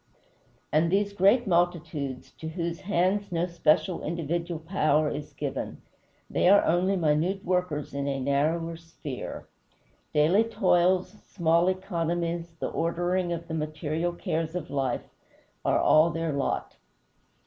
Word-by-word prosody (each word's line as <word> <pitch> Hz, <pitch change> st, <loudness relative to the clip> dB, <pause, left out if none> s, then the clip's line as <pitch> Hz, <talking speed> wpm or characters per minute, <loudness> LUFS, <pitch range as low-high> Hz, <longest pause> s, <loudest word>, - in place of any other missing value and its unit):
And 160 Hz, +2 st, +3 dB
these 200 Hz, +1 st, +1 dB
great 200 Hz, +6 st, +4 dB
multitudes, 170 Hz, -, -1 dB
to 160 Hz, -, -5 dB
whose 170 Hz, 0 st, -3 dB
hands 200 Hz, +1 st, 0 dB
no 170 Hz, 0 st, +1 dB
special, 170 Hz, +1 st, +1 dB
individual 170 Hz, +1 st, -2 dB
power 155 Hz, -3 st, +1 dB
is 145 Hz, -, -6 dB
given -, -, -4 dB, 0.5 s
they 180 Hz, -, +2 dB
are 200 Hz, +1 st, +6 dB
only 180 Hz, +4 st, +2 dB
minute 170 Hz, +3 st, +1 dB
workers 180 Hz, -6 st, -1 dB
in 140 Hz, 0 st, -2 dB
a 135 Hz, -1 st, -1 dB
narrower 155 Hz, +5 st, 0 dB
sphere. 165 Hz, -5 st, -7 dB, 0.6 s
Daily 165 Hz, +9 st, +4 dB
toils, 185 Hz, -4 st, +2 dB, 0.2 s
small 170 Hz, -1 st, +2 dB
economies, 170 Hz, -2 st, -2 dB
the -, -, -2 dB
ordering 175 Hz, +2 st, 0 dB
of 170 Hz, 0 st, -4 dB
the 160 Hz, -, -5 dB
material 155 Hz, +2 st, -2 dB
cares 165 Hz, -1 st, -3 dB
of 175 Hz, -2 st, -4 dB
life, 135 Hz, -3 st, -1 dB, 0.6 s
are -, -, +2 dB
all 155 Hz, +2 st, +5 dB
their 165 Hz, -1 st, -2 dB
lot. 140 Hz, -1 st, -2 dB
170 Hz, 130 wpm, -27 LUFS, 155-180 Hz, 0.6 s, are